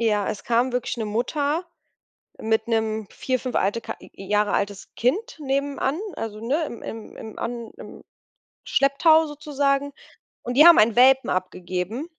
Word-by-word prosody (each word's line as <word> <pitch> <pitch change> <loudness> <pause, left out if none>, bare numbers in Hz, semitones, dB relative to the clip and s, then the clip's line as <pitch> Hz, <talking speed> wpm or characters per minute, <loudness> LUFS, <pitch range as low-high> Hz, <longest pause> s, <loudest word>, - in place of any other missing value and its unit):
ja, 210 -3 +1
es 200 - -5
kam 240 +2 +2
wirklich 250 0 -2
'ne 220 -2 -3
Mutter 290 - -1 0.7
mit 220 0 0
'nem 220 -2 -1
4, 255 -1 -2
5 255 -1 -5
alte 205 +4 +1
K - - -6
Jahre 205 +2 -2
altes 200 0 -3
Kind 380 - 0
nebenan, 280 +1 -1 0.2
also, 215 -1 -5
ne, 285 +8 0
im 235 - -9
im 220 0 -9
an 235 -1 -5
im - - -11 0.6
Schlepptau 315 +4 +4
sozusagen, 285 -1 -1 0.5
und 245 - -3
die 305 +4 +8
haben 345 - +9
einen 215 +1 +4
Welpen 265 +2 +5
abgegeben. 185 - -3
240 Hz, 150 wpm, -24 LUFS, 215-280 Hz, 0.7 s, haben